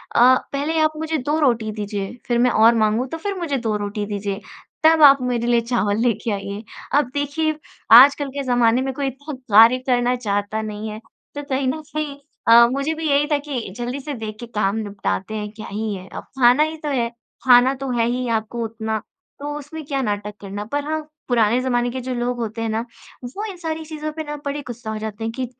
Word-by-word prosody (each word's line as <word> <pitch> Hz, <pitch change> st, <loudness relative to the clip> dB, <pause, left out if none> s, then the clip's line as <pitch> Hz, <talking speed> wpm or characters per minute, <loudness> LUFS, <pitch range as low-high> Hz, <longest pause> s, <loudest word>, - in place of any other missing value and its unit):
अ, -, -, +5 dB, 0.3 s
पहले 295 Hz, +4 st, -1 dB
आप 310 Hz, 0 st, +3 dB
मुझे 320 Hz, 0 st, -1 dB
2 295 Hz, +3 st, -1 dB
रोटी 235 Hz, -7 st, +1 dB
दीजिए 205 Hz, -1 st, -4 dB
फिर 240 Hz, -1 st, +1 dB
मैं -, -, +4 dB
और 225 Hz, +2 st, +5 dB
माँगू 220 Hz, +2 st, +2 dB
तो 325 Hz, -, -3 dB
फिर 400 Hz, +4 st, -3 dB
मुझे 305 Hz, -6 st, -1 dB
2 225 Hz, -4 st, -1 dB
रोटी 205 Hz, 0 st, -3 dB
दीजिए, 200 Hz, 0 st, -4 dB, 0.4 s
तब 320 Hz, 0 st, +6 dB
आप 275 Hz, -2 st, +8 dB
मेरे 245 Hz, -2 st, -1 dB
लिए 240 Hz, -1 st, +3 dB
चावल 220 Hz, -4 st, 0 dB
लेके 230 Hz, -1 st, 0 dB
आइए। 200 Hz, +1 st, -4 dB, 0.4 s
अब 290 Hz, -, -1 dB
देखिए 290 Hz, +2 st, -1 dB, 0.5 s
आजकल 280 Hz, +1 st, +4 dB
के 280 Hz, -, -1 dB
ज़माने 245 Hz, -1 st, +3 dB
में 265 Hz, 0 st, -2 dB
कोई 280 Hz, 0 st, -2 dB
इतना 285 Hz, +3 st, -6 dB, 0.2 s
कार्य 230 Hz, +3 st, +8 dB
करना 245 Hz, -1 st, +2 dB
चाहता 205 Hz, -2 st, -2 dB
नहीं 215 Hz, 0 st, -5 dB
है। 215 Hz, 0 st, -7 dB, 0.4 s
तो 290 Hz, -, -4 dB
कहीं 270 Hz, -1 st, -1 dB
न 310 Hz, +4 st, -1 dB
कहीं 305 Hz, -2 st, -3 dB, 0.3 s
अ, 235 Hz, +1 st, +8 dB
मुझे 275 Hz, +4 st, -1 dB
भी 320 Hz, 0 st, -3 dB
यही 285 Hz, +1 st, +3 dB
था 295 Hz, -, +4 dB
कि 255 Hz, -8 st, -3 dB
जल्दी 245 Hz, +3 st, -3 dB
से 290 Hz, +2 st, -5 dB
देख 220 Hz, -2 st, -6 dB
के 240 Hz, -, -6 dB
काम 200 Hz, -1 st, +1 dB
निपटाते 205 Hz, -1 st, -3 dB
हैं 210 Hz, -1 st, -4 dB
क्या 215 Hz, 0 st, -9 dB
ही 215 Hz, +1 st, -2 dB
है, 185 Hz, 0 st, -9 dB
अब -, -, -7 dB, 0.2 s
खाना 250 Hz, +4 st, +6 dB
ही 315 Hz, +1 st, -3 dB
तो 300 Hz, -, -2 dB
है। 240 Hz, -4 st, 0 dB, 0.3 s
खाना 255 Hz, +1 st, +6 dB
तो 270 Hz, -, -2 dB
है 230 Hz, -, +3 dB
ही 250 Hz, +1 st, -2 dB
आपको 220 Hz, +2 st, -5 dB
उतना, 220 Hz, 0 st, -3 dB, 0.4 s
तो 290 Hz, +1 st, -4 dB
उसमें 300 Hz, +2 st, -8 dB
क्या 275 Hz, -1 st, -1 dB
नाटक 210 Hz, -3 st, -2 dB
करना? 205 Hz, +1 st, -6 dB
पर 285 Hz, +6 st, -3 dB
हाँ 315 Hz, 0 st, -1 dB, 0.3 s
पुराने 235 Hz, -1 st, +3 dB
ज़माने 245 Hz, -1 st, 0 dB
के 260 Hz, +1 st, -4 dB
जो 255 Hz, +1 st, -4 dB
लोग 245 Hz, +1 st, -1 dB
होते 225 Hz, 0 st, -4 dB
हैं 225 Hz, -, -1 dB
ना, 220 Hz, +2 st, -2 dB, 0.4 s
वो 265 Hz, -, -5 dB
इन 395 Hz, -4 st, -7 dB
सारी 320 Hz, -2 st, -4 dB
चीज़ों 310 Hz, -1 st, -5 dB
पे 315 Hz, 0 st, -5 dB
ना 295 Hz, -1 st, -5 dB
बड़े 285 Hz, +1 st, -2 dB
गुस्सा 235 Hz, -2 st, -6 dB
हो 220 Hz, -, -3 dB
जाते 215 Hz, 0 st, -6 dB
हैं 225 Hz, -, -2 dB
कि 255 Hz, -, 0 dB
245 Hz, 225 wpm, -21 LUFS, 220-285 Hz, 0.5 s, आप